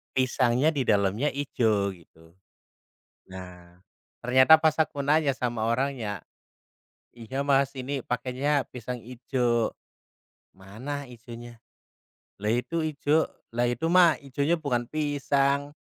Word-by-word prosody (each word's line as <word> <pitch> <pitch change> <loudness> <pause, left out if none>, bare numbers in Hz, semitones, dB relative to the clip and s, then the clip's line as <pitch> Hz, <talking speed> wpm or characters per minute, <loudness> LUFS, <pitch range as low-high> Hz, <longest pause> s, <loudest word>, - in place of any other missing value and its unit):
Pisangnya 130 +2 +2
di 145 - -1
dalamnya 100 +6 +2
hijau 110 -8 0
gitu, 80 -1 -20 1.0
nah 90 -1 -11 0.4
ternyata 130 +6 +6
pas 155 -1 +3
aku 155 -2 0
nanya 145 +1 +2
sama 120 -3 -2
orangnya, 115 - -1 0.9
"Iya 120 +4 -5
Mas, 140 -1 +2
ini 135 +2 -3
pakainya 135 +3 0
pisang 125 0 -6
hijau, 120 -1 -1 0.8
'mana 125 +10 -6
hijaunya?' 120 -1 -11 0.8
Lah 105 - 0
itu 160 +7 -1
hijau, 155 0 +1 0.3
'lah 120 +1 +2
itu 120 +7 -2
mah 175 -1 +5
hijaunya 140 +4 -1
bukan 125 -5 -1
pisang, 145 -1 0
130 Hz, 110 wpm, -27 LUFS, 115-145 Hz, 1.0 s, ternyata